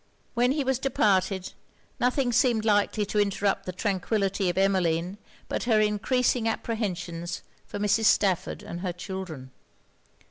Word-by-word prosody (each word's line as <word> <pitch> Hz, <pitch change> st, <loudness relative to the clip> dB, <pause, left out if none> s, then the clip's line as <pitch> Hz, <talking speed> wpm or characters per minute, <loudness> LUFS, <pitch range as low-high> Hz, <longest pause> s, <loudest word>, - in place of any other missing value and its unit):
When 245 Hz, +2 st, +2 dB
he 290 Hz, -1 st, 0 dB
was 265 Hz, -1 st, 0 dB
departed, 195 Hz, -8 st, +1 dB, 0.5 s
nothing 250 Hz, 0 st, +1 dB
seemed 235 Hz, -2 st, +3 dB
likely 210 Hz, 0 st, +2 dB
to 210 Hz, +1 st, -1 dB
interrupt 200 Hz, -1 st, 0 dB
the -, -, -1 dB
tranquillity 195 Hz, 0 st, 0 dB
of 175 Hz, -, -3 dB
Emmeline 185 Hz, -1 st, +1 dB, 0.3 s
but -, -, -2 dB
her 225 Hz, -3 st, +4 dB
encreasing 225 Hz, +3 st, +1 dB
apprehensions 180 Hz, -7 st, -3 dB, 0.2 s
for -, -, -6 dB
Mrs. 210 Hz, +2 st, +2 dB
Stafford 195 Hz, -4 st, +2 dB
and 170 Hz, -, -6 dB
her 180 Hz, -1 st, -3 dB
children. 175 Hz, -7 st, -7 dB
205 Hz, 135 wpm, -27 LUFS, 185-225 Hz, 0.5 s, her